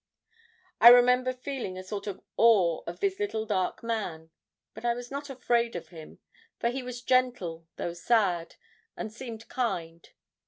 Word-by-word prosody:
I 235 - +9
remember 250 +1 +7
feeling 255 -7 -5
a 185 - -6
sort 200 +2 -6
of 200 - -6
awe 195 -8 +4
of 170 - -7
this 390 0 0
little 225 - -2
dark 195 -2 -1
man; 180 -9 -4 0.4
but 220 - -11
I 240 0 +1
was 245 +1 -8
not 285 +1 -5
afraid 235 -3 0
of 165 -2 -6
him, 160 -2 -12 0.4
for 235 - +1
he 260 +2 -3
was 250 -1 -7
gentle, 235 -11 0
though 170 - -4
sad 175 -2 +1 0.4
and 220 -1 -5
seemed 230 -2 -8
kind. 170 -9 -3
230 Hz, 160 wpm, -28 LUFS, 180-250 Hz, 0.4 s, I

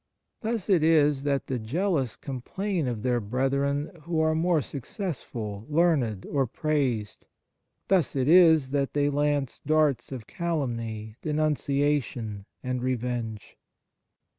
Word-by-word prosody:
Thus 225 -3 -2
it 185 -6 +4
is 150 -3 +4
that 140 -1 0
the 130 -2 -2
jealous 140 - 0
com 130 -3 -6
plain 190 0 -2
of 115 -3 -3
their 125 -1 +2
brethren 140 +6 0
who 170 -1 -1
are 160 0 +3
more 165 +1 +2
success 150 - -5
ful, 105 -2 -6
learned, 150 - +2
or 135 -3 0
praised; 130 -6 -1 0.6
thus 180 -9 +2
it 130 -1 +1
is 160 -5 +6
that 140 -1 0
they 145 0 +2
lance 145 -2 0
darts 150 -3 +2
of 125 -5 -6
calumny, 115 - -3
denunciation, 145 -8 0 0.2
and 125 -1 -2
revenge. 120 -3 -3
140 Hz, 130 wpm, -27 LUFS, 120-155 Hz, 0.6 s, is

